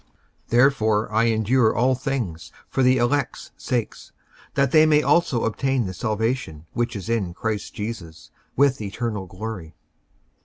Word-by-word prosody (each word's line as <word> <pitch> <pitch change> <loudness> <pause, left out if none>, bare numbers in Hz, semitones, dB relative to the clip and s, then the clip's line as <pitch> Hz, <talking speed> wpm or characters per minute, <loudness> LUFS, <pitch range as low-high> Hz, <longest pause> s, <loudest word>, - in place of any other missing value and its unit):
55:002:010 - - -36
Therefore 110 -4 +3
I 110 +1 +3
endure 115 +1 +2
all 125 +3 +3
things 125 -11 -3 0.2
for - - -1
the 130 0 +4
elect's 130 +2 -1
sakes, 120 -4 -3 0.4
that 140 -1 +2
they 155 0 +6
may 150 -1 +4
also 170 -9 +2
obtain 130 +2 0
the 95 - -4
salvation 110 - -2
which 120 0 -1
is 100 -1 -6
in 105 -7 -1
Christ 110 -1 -3
Jesus 95 -7 -7 0.2
with 140 -2 +3
eternal 105 -1 -4
glory. 90 -4 -7
115 Hz, 145 wpm, -23 LUFS, 105-130 Hz, 0.4 s, they